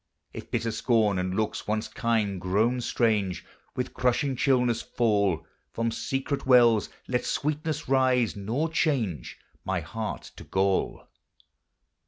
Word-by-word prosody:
If - - -8
bitter 115 - -1
scorn, 110 -3 +2
and 90 +1 -2
looks, 110 +1 -2
once 110 +1 -1
kind, 110 -5 -1
grown 110 +7 +1
strange, 105 -8 0 0.3
With 125 - -3
crushing 125 +2 +1
chillness 125 -3 +2
fall, 100 -8 +1 0.3
From 115 0 -1
secret 135 +3 -3
wells 120 -4 +5 0.2
let 125 -1 0
sweetness 150 +1 -2
rise, 130 -3 +2
nor 115 +10 -1
change 120 - -1 0.3
My 95 -1 -1
heart 110 +7 -5
to - - -9
gall 95 0 0
115 Hz, 125 wpm, -27 LUFS, 100-125 Hz, 0.3 s, wells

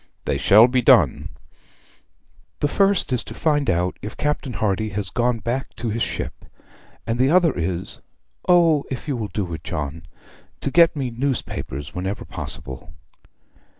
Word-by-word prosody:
'They - - 0
shall 110 +5 +7
be 125 0 +1
done.' - - +4 1.3
'The 145 - +2
first 195 -3 +2
is 125 - 0
to - - -9
find 150 -3 +1
out 90 0 0
if 105 +1 -7
Captain 145 -3 -2
Hardy 110 0 0
has 100 -1 -4
gone 120 0 +1
back 120 +4 -3
to 120 - -3
his 115 +2 -2
ship; - - -3 0.6
and 115 +1 -2
the 130 +1 +4
other 170 -2 +4
is 85 +1 -2 0.5
O 165 -5 +5
if 130 +2 -5
you 140 - -1
will 110 -3 -3
do 95 -5 -4
it, 80 - -6
John! 75 +1 -5 0.5
to 140 - -2
get 170 +1 +5
me 135 -4 -2
newspapers 115 - -3
whenever 95 +4 -4
possible.' 65 -1 -6
120 Hz, 155 wpm, -22 LUFS, 95-140 Hz, 1.3 s, shall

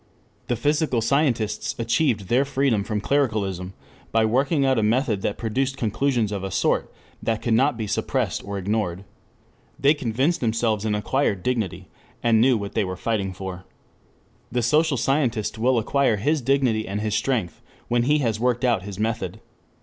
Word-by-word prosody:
The 120 - 0
physical 145 +1 +1
scientists 120 -3 0
achieved 115 0 +1
their 120 +8 +2
freedom 135 -6 +1
from 105 0 -2
clericalism 100 -9 -1 0.4
by 110 0 +3
working 135 +6 +2
out 130 -3 +3
a - - +2
method 110 -1 +1
that 100 - -2
produced 130 +4 -1
conclusions 120 -1 0
of 100 -2 -3
a 95 - -3
sort - - 0 0.3
that 115 -1 -1
could 115 - +1
not 130 +3 +3
be 110 - -3
suppressed 100 - -1
or 100 0 -5
ignored. 95 -2 -2 0.8
They 140 +2 +5
convinced 135 +4 0
themselves 110 -2 0
and 105 -1 +1
acquired 105 -3 0
dignity, 115 -8 -2 0.4
and 115 -2 +4
knew 125 0 +4
what 100 -1 -5
they 110 - +1
were 95 -1 -4
fighting 100 -2 -1
for. 95 -1 -7 0.9
The 120 0 0
social 150 +4 +3
scientist 120 -6 0
will 125 +2 +3
acquire 125 +1 +2
his 145 +9 0
dignity 125 -4 +1
and 100 +2 -3
his 105 -1 -1
strength 110 -7 -1 0.3
when 120 0 +2
he 145 +5 +3
has 110 -2 0
worked 125 +1 +1
out 115 -6 +2
his 100 0 -8
method. 110 -2 -2
115 Hz, 170 wpm, -24 LUFS, 105-135 Hz, 0.9 s, They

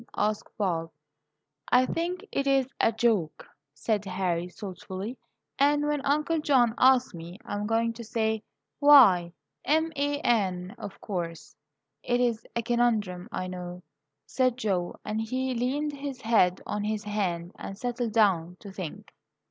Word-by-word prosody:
asked 210 0 0
Bob. 170 -5 -1 0.8
"I 250 +1 +6
think 355 +7 -3
it 275 - -1
is 270 -1 +4
a - - +4
joke," 220 -8 0 0.2
said 200 +8 -1
Harry, 180 -2 -1
thoughtfully; 190 +3 -7 0.4
"and 290 +1 +3
when 295 -1 0
Uncle 305 +4 +1
John 255 -6 +3
asks 255 -1 +5
me, 170 +2 -9
I - - -6
am 205 0 -2
going 230 +1 +1
to 235 - -8
say, 220 -1 -1 0.4
'Why, 240 -13 +7 0.3
m 320 +3 +2
a 285 +1 0
n, 190 - 0
of 200 - -8
course.'" 170 -5 -5 0.5
"It 245 0 0
is 235 -3 0
a 235 - 0
conundrum, 220 -5 0
I 185 - -3
know," 180 -1 -7 0.4
said 255 -2 +1
Joe; 190 -7 -1
and 215 +1 -2
he 255 +3 -2
leaned 275 +5 -1
his 280 -2 -6
head 190 -6 +3
on 210 - -3
his 215 0 -2
hand 185 -5 -2
and 195 - -7
settled 245 -1 -2
down 180 -6 +2
to 200 - -9
think. 185 -5 -8
220 Hz, 150 wpm, -28 LUFS, 185-255 Hz, 0.8 s, Why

